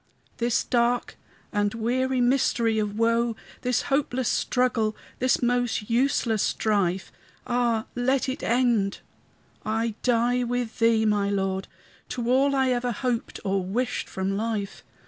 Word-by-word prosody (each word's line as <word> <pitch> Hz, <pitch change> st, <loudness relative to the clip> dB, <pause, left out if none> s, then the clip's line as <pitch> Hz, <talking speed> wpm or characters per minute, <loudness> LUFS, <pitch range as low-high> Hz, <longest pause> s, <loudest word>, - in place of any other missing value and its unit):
This 235 Hz, -1 st, +1 dB
dark 240 Hz, 0 st, +1 dB, 0.4 s
and 205 Hz, 0 st, 0 dB
weary 255 Hz, +3 st, 0 dB
mystery 240 Hz, -3 st, +2 dB
of 210 Hz, 0 st, -2 dB
woe, 230 Hz, 0 st, +2 dB, 0.3 s
This 250 Hz, -1 st, 0 dB
hopeless 265 Hz, -3 st, 0 dB
struggle, 230 Hz, -4 st, +1 dB, 0.2 s
this 255 Hz, 0 st, +2 dB
most 245 Hz, -3 st, 0 dB
useless 235 Hz, -3 st, +2 dB
strife, 190 Hz, -4 st, 0 dB, 0.3 s
Ah, 240 Hz, -2 st, +1 dB
let 260 Hz, +2 st, +1 dB
it 260 Hz, -, -3 dB
end! 235 Hz, -5 st, +1 dB, 0.6 s
I 225 Hz, +1 st, -1 dB
die 245 Hz, 0 st, +2 dB
with 245 Hz, -1 st, -3 dB
thee, 230 Hz, -1 st, +4 dB
my 205 Hz, -2 st, +2 dB
Lord, 195 Hz, -1 st, -1 dB, 0.4 s
To 245 Hz, -1 st, -2 dB
all 275 Hz, +2 st, +3 dB
I 265 Hz, -1 st, +2 dB
ever 245 Hz, 0 st, 0 dB
hoped 240 Hz, +1 st, -2 dB
or 195 Hz, -1 st, 0 dB
wished 240 Hz, +7 st, -2 dB
from 190 Hz, +1 st, -2 dB
life. 210 Hz, -2 st, -3 dB
235 Hz, 130 wpm, -26 LUFS, 215-245 Hz, 0.6 s, thee